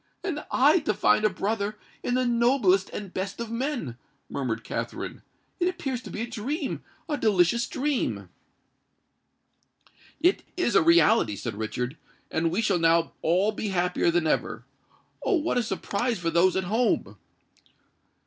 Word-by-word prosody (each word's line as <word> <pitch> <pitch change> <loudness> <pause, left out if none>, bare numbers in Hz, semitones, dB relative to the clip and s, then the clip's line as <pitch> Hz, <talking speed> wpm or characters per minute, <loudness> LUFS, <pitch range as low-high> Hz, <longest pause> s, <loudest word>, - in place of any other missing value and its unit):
"And 315 -6 -3
I 295 +7 +5
to 215 -9 -1
find 210 +1 +3
a - - +5
brother 205 +2 -2 0.2
in 245 - -1
the 255 0 +2
noblest 235 -5 +3
and 200 -3 -7
best 195 +3 -4
of 230 -1 -4
men!" 235 - -3 0.3
murmured 115 -5 -3
Katherine: - - -5 0.4
"it 355 - +2
appears 275 -9 -3
to - - -10
be 215 - -5
a 235 - -2
dream—a 280 - -4
delicious 215 +3 +3
dream!" 285 0 -1 1.9
"It 350 +5 +3 0.2
is 295 - +1
a - - +6
reality," 160 -10 +4
said 115 +3 -4
Richard; 120 +6 -4 0.3
"and 165 +1 +1
we 190 +7 0
shall 185 -5 +2
now 165 0 +3
all 185 +6 +2
be 215 0 -4
happier 180 -2 +1
than 170 -1 +1
ever. 155 - -1 0.6
Oh! 395 - +2
what 320 -6 +1
a - - +2
surprise 230 +1 -2
for 165 -1 -2
those 175 +3 +4
at 190 - +1
home!" 225 +6 0
210 Hz, 150 wpm, -26 LUFS, 170-250 Hz, 1.9 s, a